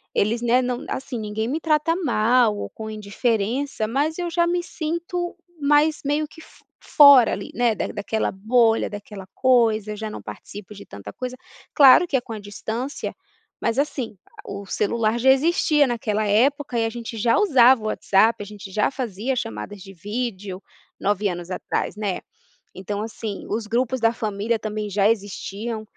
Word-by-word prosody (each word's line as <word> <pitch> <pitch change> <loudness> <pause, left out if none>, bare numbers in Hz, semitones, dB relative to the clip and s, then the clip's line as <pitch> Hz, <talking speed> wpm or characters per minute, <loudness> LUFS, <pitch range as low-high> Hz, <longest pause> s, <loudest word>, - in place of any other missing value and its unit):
Eles, 225 +3 +1
né, 240 +1 +3
não, 250 -1 -3
assim, 260 -2 -4
ninguém 215 +1 -3
me 290 +6 -2
trata 310 0 +1
mal 240 - +2
ou - - -5
com 220 0 -7
indiferença, 220 +3 -1
mas 290 +7 -1
eu 350 -1 -2
já 340 0 +2
me 350 0 0
sinto 345 +2 -4 0.3
mais 295 +2 +3
meio 295 +2 0
que 320 - -15
fo - - -19
fora 280 -6 +7
ali, - - -5
né, 240 -2 +2
daquela 215 +2 -2
bolha, 225 +3 +2
daquela 205 -2 -9
coisa, 225 -5 +2
já 215 0 -5
não - - -7
participo 205 0 -10
de 200 - -11
tanta 100 0 -10
coisa. 255 - -6 0.4
Claro 285 +4 +7
que 290 - -1
é 260 - +2
com 230 - -8
a 215 - -6
distância, 220 +6 -5 0.4
mas 230 - 0
assim, 265 -6 -2 0.3
o 200 0 -6
celular 220 +3 0
já 265 +3 +5
existia 295 0 +3
naquela 215 -3 -1
época 255 +5 +2
e 225 - +1
a - - 0
gente 230 0 -7
já 230 +2 +2
usava 260 - +5
o - - -2
WhatsApp, 215 +2 +2
a - - -9
gente 200 -1 -10
já 210 +5 +1
fazia 250 -1 -3
chamadas 185 - -5
de 195 - -11
vídeo 200 -1 -5 0.4
9 205 +1 0
anos 175 -2 -5
atrás, 185 - -3
né. 205 -3 -2 0.6
Então 200 +2 -4
assim, 215 -2 -6
os 220 +1 -2
grupos 250 +3 0
da 225 0 +3
família 220 0 -2
também 215 -1 -4
já 200 +1 +3
existiam 215 +1 -3
225 Hz, 170 wpm, -23 LUFS, 210-265 Hz, 0.6 s, fora